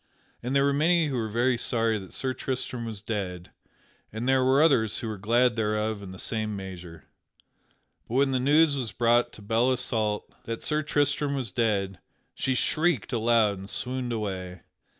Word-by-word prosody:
And 125 Hz, +3 st, -2 dB
there 140 Hz, -, +4 dB
were 140 Hz, 0 st, +2 dB
many 160 Hz, +2 st, +3 dB
who 135 Hz, -, -2 dB
were 115 Hz, -3 st, -1 dB
very 120 Hz, +2 st, +1 dB
sorry 115 Hz, -3 st, +1 dB
that 95 Hz, -2 st, -11 dB
Sir 130 Hz, -1 st, -2 dB
Tristram 125 Hz, -2 st, -3 dB
was 110 Hz, -4 st, -7 dB
dead 90 Hz, -5 st, -4 dB, 0.6 s
and 110 Hz, +3 st, -4 dB
there 130 Hz, -1 st, +4 dB
were 130 Hz, +2 st, +4 dB
others 115 Hz, -9 st, +3 dB
who 120 Hz, -, -3 dB
were 110 Hz, -3 st, -5 dB
glad 120 Hz, +3 st, +3 dB
thereof 110 Hz, -1 st, -1 dB
in 100 Hz, -, -8 dB
the 95 Hz, -, -9 dB
same 110 Hz, +1 st, -2 dB
measure. 90 Hz, -4 st, -8 dB, 1.0 s
But 115 Hz, -, -4 dB
when 135 Hz, 0 st, +3 dB
the 130 Hz, -, +1 dB
news 145 Hz, +3 st, +4 dB
was 125 Hz, -5 st, -3 dB
brought 120 Hz, 0 st, +2 dB
to 105 Hz, -, -13 dB
Belle 115 Hz, +4 st, +2 dB
Isoult 110 Hz, -4 st, -1 dB, 0.2 s
that 115 Hz, 0 st, -5 dB
Sir 150 Hz, 0 st, 0 dB
Tristram 145 Hz, -1 st, 0 dB
was 125 Hz, -7 st, -3 dB
dead, 100 Hz, -4 st, 0 dB, 0.3 s
she 130 Hz, -, -1 dB
shrieked 155 Hz, -, +1 dB
aloud 115 Hz, -3 st, +2 dB
and 95 Hz, +1 st, -9 dB
swooned 125 Hz, -1 st, -3 dB
away. 95 Hz, -5 st, -4 dB
115 Hz, 180 wpm, -27 LUFS, 105-130 Hz, 1.0 s, there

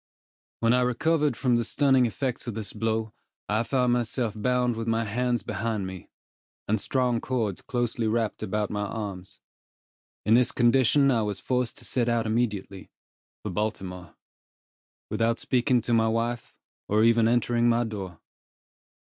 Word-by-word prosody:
When 115 Hz, 0 st, +4 dB
I 125 Hz, -, +3 dB
recovered 145 Hz, +3 st, +1 dB
from 125 Hz, -2 st, +2 dB
the 120 Hz, -, +1 dB
stunning 130 Hz, 0 st, +3 dB
effects 125 Hz, +1 st, -3 dB
of 115 Hz, -, -4 dB
this 110 Hz, -3 st, -5 dB
blow, 110 Hz, 0 st, -2 dB, 0.3 s
I 105 Hz, +2 st, +1 dB
found 125 Hz, 0 st, +1 dB
myself 120 Hz, -1 st, -1 dB
bound 125 Hz, +2 st, +1 dB
with 115 Hz, 0 st, -4 dB
my 115 Hz, 0 st, +1 dB
hands 120 Hz, +1 st, -1 dB
behind 110 Hz, -1 st, -2 dB
me, 95 Hz, -1 st, -8 dB, 0.6 s
and 110 Hz, 0 st, +1 dB
strong 125 Hz, -3 st, 0 dB
cords 115 Hz, -7 st, -2 dB
closely 120 Hz, -2 st, -1 dB
wrapped 110 Hz, -1 st, -1 dB
about 105 Hz, 0 st, -2 dB
my 105 Hz, -, -2 dB
arms. 100 Hz, -3 st, -6 dB, 0.8 s
In 105 Hz, -, +4 dB
this 120 Hz, +1 st, +4 dB
condition 130 Hz, +3 st, +4 dB
I 115 Hz, -3 st, +2 dB
was 105 Hz, -2 st, -2 dB
forced 125 Hz, -2 st, -1 dB
to -, -, -7 dB
set 120 Hz, -2 st, 0 dB
out 115 Hz, -1 st, +1 dB
immediately, 105 Hz, -4 st, -2 dB, 0.5 s
for 105 Hz, -, -4 dB
Baltimore, 90 Hz, -4 st, -4 dB, 1.0 s
without 115 Hz, +2 st, +1 dB
speaking 125 Hz, 0 st, +1 dB
to 120 Hz, +1 st, -1 dB
my 110 Hz, -1 st, +3 dB
wife, 115 Hz, +1 st, -2 dB, 0.3 s
or 105 Hz, +1 st, +3 dB
even 115 Hz, 0 st, +4 dB
entering 120 Hz, 0 st, +2 dB
my 120 Hz, +1 st, +3 dB
door. 95 Hz, -7 st, -6 dB
115 Hz, 155 wpm, -26 LUFS, 105-125 Hz, 1.0 s, When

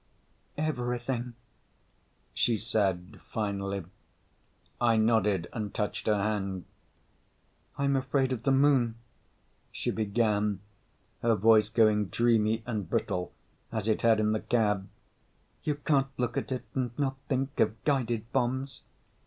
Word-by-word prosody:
"Everything," 125 Hz, -4 st, -2 dB, 1.0 s
she 115 Hz, -2 st, +2 dB
said 100 Hz, -4 st, -1 dB
finally. 100 Hz, -2 st, -2 dB, 1.1 s
I 115 Hz, -, +4 dB
nodded 105 Hz, -5 st, +2 dB
and 105 Hz, -3 st, -3 dB
touched 105 Hz, +1 st, -2 dB
her 105 Hz, -1 st, +3 dB
hand. 100 Hz, -3 st, -2 dB, 1.1 s
"I'm 140 Hz, 0 st, +2 dB
afraid 135 Hz, 0 st, +1 dB
of 125 Hz, -4 st, -2 dB
the 135 Hz, -, +1 dB
Moon," 135 Hz, -4 st, +4 dB, 0.8 s
she -, -, -2 dB
began, 105 Hz, -2 st, +1 dB, 0.6 s
her 115 Hz, -1 st, +3 dB
voice 110 Hz, 0 st, +5 dB
going 110 Hz, -2 st, +4 dB
dreamy 115 Hz, 0 st, +2 dB
and 105 Hz, -7 st, -3 dB
brittle 90 Hz, 0 st, -1 dB, 0.4 s
as 110 Hz, -2 st, -2 dB
it 110 Hz, -, +1 dB
had 115 Hz, -2 st, +4 dB
in 105 Hz, 0 st, +2 dB
the 110 Hz, -, +1 dB
cab. 105 Hz, -5 st, 0 dB, 0.7 s
"You 150 Hz, -, 0 dB
can't 145 Hz, -2 st, +1 dB
look 125 Hz, -1 st, -1 dB
at -, -, -3 dB
it 130 Hz, -, -3 dB
and 125 Hz, -3 st, -2 dB
not 135 Hz, -2 st, 0 dB
think 135 Hz, +1 st, -1 dB
of 110 Hz, +1 st, +1 dB
guided 120 Hz, -5 st, 0 dB
bombs." 130 Hz, +2 st, -1 dB
115 Hz, 125 wpm, -29 LUFS, 105-130 Hz, 1.1 s, voice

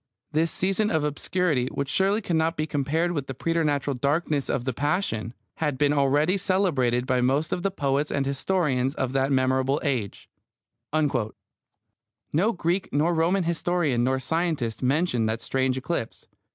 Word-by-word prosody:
This 160 Hz, +2 st, +1 dB
season 195 Hz, +3 st, +1 dB
of 160 Hz, -5 st, +1 dB
obscurity, 150 Hz, -2 st, 0 dB
which 140 Hz, +1 st, -3 dB
surely 195 Hz, +8 st, +1 dB
cannot 165 Hz, -2 st, 0 dB
be 155 Hz, -, 0 dB
compared 155 Hz, +4 st, 0 dB
with 145 Hz, -6 st, -3 dB
the 135 Hz, -, -5 dB
preternatural 145 Hz, -2 st, 0 dB
darkness 145 Hz, +2 st, 0 dB
of 120 Hz, -, -1 dB
the 130 Hz, -, -1 dB
Passion, 140 Hz, -, -1 dB, 0.2 s
had 150 Hz, -4 st, -1 dB
been 145 Hz, +1 st, +3 dB
already 145 Hz, +6 st, +2 dB
celebrated 155 Hz, -11 st, +1 dB
by 130 Hz, -1 st, +1 dB
most 135 Hz, +5 st, +1 dB
of 180 Hz, -, -2 dB
the 195 Hz, -, +1 dB
poets 145 Hz, -5 st, 0 dB
and 140 Hz, -1 st, -1 dB
historians 140 Hz, -2 st, 0 dB
of 130 Hz, -1 st, -2 dB
that 135 Hz, +1 st, +1 dB
memorable 130 Hz, +1 st, +2 dB
age. 125 Hz, -9 st, -2 dB, 0.6 s
No 150 Hz, -, -3 dB
Greek 180 Hz, -1 st, -1 dB
nor 155 Hz, +5 st, +2 dB
Roman 170 Hz, +4 st, +2 dB
historian 170 Hz, -6 st, 0 dB
nor 130 Hz, +1 st, +2 dB
scientist 140 Hz, -5 st, -1 dB
mentioned 130 Hz, -4 st, +1 dB
that 110 Hz, +1 st, -1 dB
strange 130 Hz, 0 st, 0 dB
eclipse. 130 Hz, -3 st, -4 dB
145 Hz, 150 wpm, -25 LUFS, 130-170 Hz, 0.6 s, been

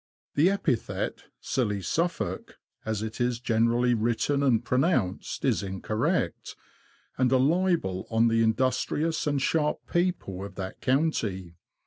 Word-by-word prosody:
The 155 Hz, +6 st, +4 dB
epithet, 155 Hz, -, -2 dB
'' -, -, -55 dB
Silly 105 Hz, -7 st, 0 dB
Suffolk,'' 170 Hz, -, -2 dB, 0.3 s
as 110 Hz, -1 st, -2 dB
it 110 Hz, +3 st, -5 dB
is 120 Hz, -1 st, 0 dB
generally 120 Hz, +1 st, +2 dB
written 120 Hz, +5 st, +1 dB
and 120 Hz, -4 st, +2 dB
pronounced, 125 Hz, -, 0 dB
is -, -, +2 dB
incorrect, 100 Hz, +2 st, -2 dB, 0.6 s
and 130 Hz, -1 st, +3 dB
a 130 Hz, -, +5 dB
libel 155 Hz, -, +1 dB
on 115 Hz, +1 st, +3 dB
the 115 Hz, 0 st, +2 dB
industrious 130 Hz, +8 st, 0 dB
and 145 Hz, -1 st, +1 dB
sharp 150 Hz, +3 st, 0 dB
people 175 Hz, -, -1 dB
of 100 Hz, -1 st, -8 dB
that 95 Hz, -1 st, -6 dB
county. 115 Hz, -, 0 dB
120 Hz, 130 wpm, -27 LUFS, 110-145 Hz, 0.6 s, a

